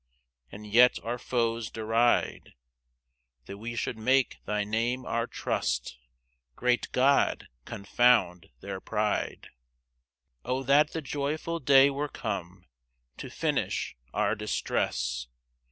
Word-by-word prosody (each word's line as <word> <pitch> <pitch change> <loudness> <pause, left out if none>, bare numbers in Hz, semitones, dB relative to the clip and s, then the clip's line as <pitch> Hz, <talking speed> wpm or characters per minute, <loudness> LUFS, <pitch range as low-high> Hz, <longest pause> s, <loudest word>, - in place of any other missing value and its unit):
And 105 +2 -10
yet 120 +4 +5
our 120 +2 -3
foes 115 -3 -1
deride, 115 +2 0 0.9
That 100 +8 -9
we 115 +2 -5
should 115 0 -3
make 130 +2 +2
thy 105 0 -1
name 115 +4 -1
our 115 +1 -1
trust; - - -2 0.6
Great 125 0 0
God, 135 +2 +2 0.2
confound 100 -4 +2
their 100 -1 -6
pride. 105 -1 -2 0.9
4 125 - -5
O 130 +1 -2
that 145 +3 +4
the 160 - -4
joyful 150 +4 -3
day 140 0 +6
were 145 +2 -3
come 95 -6 -5 0.5
To - - -7
finish - - -2 0.2
our - - +1
distress! - - -2
115 Hz, 115 wpm, -28 LUFS, 105-130 Hz, 0.9 s, day